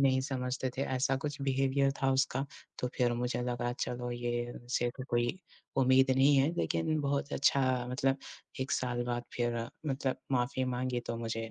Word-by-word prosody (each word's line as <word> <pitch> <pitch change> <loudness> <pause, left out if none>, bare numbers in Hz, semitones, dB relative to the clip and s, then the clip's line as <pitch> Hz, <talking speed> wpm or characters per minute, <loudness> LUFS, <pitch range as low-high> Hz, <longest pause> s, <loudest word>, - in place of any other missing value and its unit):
नहीं 130 -1 +4
समझते 130 -1 -2
थे, - - +2
ऐसा 130 0 +1
कुछ 145 +1 -4
बिहेवियर 135 0 +2
था 135 - +4
उसका, 135 0 +1 0.3
तो 125 - -1
फिर 120 -1 +3
मुझे 120 +1 -1
लगा 120 0 -1
चलो 125 0 -2
ये, 120 0 -1
इनसे 120 0 -1
तो 130 - -4
कोई 120 0 +2 0.5
उम्मीद 130 0 +5
नहीं 140 +2 +6
है, 140 +4 +4
लेकिन 160 -2 +1
बहुत 140 0 -1
अच्छा, 130 -3 +3
मतलब 135 +1 +2 0.4
1 130 - -1
साल 120 -1 0
बाद 120 0 -2
फिर 120 -1 0 0.2
मतलब 135 -2 0 0.2
माफ़ी 130 +1 +1
माँगी 125 0 -1
तो 115 - -2
मुझे 115 -1 -3
130 Hz, 170 wpm, -32 LUFS, 120-135 Hz, 0.5 s, नहीं